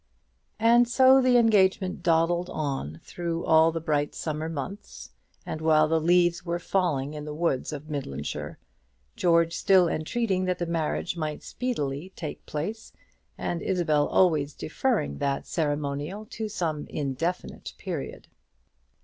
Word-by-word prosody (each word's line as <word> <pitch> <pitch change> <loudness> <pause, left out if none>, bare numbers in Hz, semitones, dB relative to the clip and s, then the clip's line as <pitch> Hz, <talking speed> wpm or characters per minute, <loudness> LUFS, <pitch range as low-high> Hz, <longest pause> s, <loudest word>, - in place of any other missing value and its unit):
And 235 +2 +5
so 260 +2 +6
the 250 -1 +4
engagement 195 -5 +3
dawdled 170 +1 +2
on 135 - -3
through 170 -1 -4
all 160 +1 +5
the 165 - -3
bright 150 -2 -1
summer 155 0 -3
months; 165 +7 -7 0.3
and 155 - -5
while 155 -1 +4
the 160 +1 +2
leaves 175 +1 +3
were 170 -1 -2
falling 165 -6 -1
in 150 -1 -6
the 150 0 -6
woods 160 -5 -1
of 150 0 -7
Midlandshire, 75 - -5 0.6
George 170 -1 +3
still 185 0 +4
entreating 185 +4 -1
that 180 -1 0
the 175 - -2
marriage 170 +1 -2
might 155 -2 -4
speedily 170 - -3
take 155 -3 -6
place, 205 +10 -4 0.5
and 170 -2 -3
Isabel 160 -6 +1
always 155 -6 +2
deferring 70 0 -1
that 140 -1 -1
ceremonial 150 +5 -2
to 220 -1 -4
some 160 -7 -3
indefinite 150 +5 -4
period. 175 -7 -6
165 Hz, 135 wpm, -27 LUFS, 150-185 Hz, 0.6 s, so